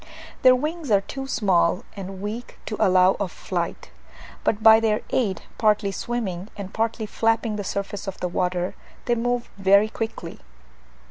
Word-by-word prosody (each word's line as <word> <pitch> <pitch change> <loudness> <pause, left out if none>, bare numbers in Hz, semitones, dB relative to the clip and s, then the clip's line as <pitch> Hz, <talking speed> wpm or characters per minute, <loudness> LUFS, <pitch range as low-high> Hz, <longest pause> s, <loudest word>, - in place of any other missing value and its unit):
Their 255 0 +7
wings 305 +2 -3
are 200 -2 +4
too 270 +7 -6
small 190 -8 +2
and 195 -1 -7
weak 225 +4 -6
to 215 - -3
allow 185 0 +5
of 195 -4 -2
flight, 175 -1 -4 0.5
but 215 0 0
by 220 0 +9
their 220 -1 +1
aid, 200 -8 0 0.2
partly 210 -2 +3
swimming 195 -4 -3
and 195 -2 -7
partly 225 0 -1
flapping 225 +1 0
the 205 - -3
surface 200 +1 -4
of 195 - -5
the 180 - -1
water, 180 0 -1 0.3
they 240 - +2
move 245 +1 -1
very 200 +2 +5
quickly. 225 0 -5
210 Hz, 155 wpm, -24 LUFS, 190-230 Hz, 0.5 s, by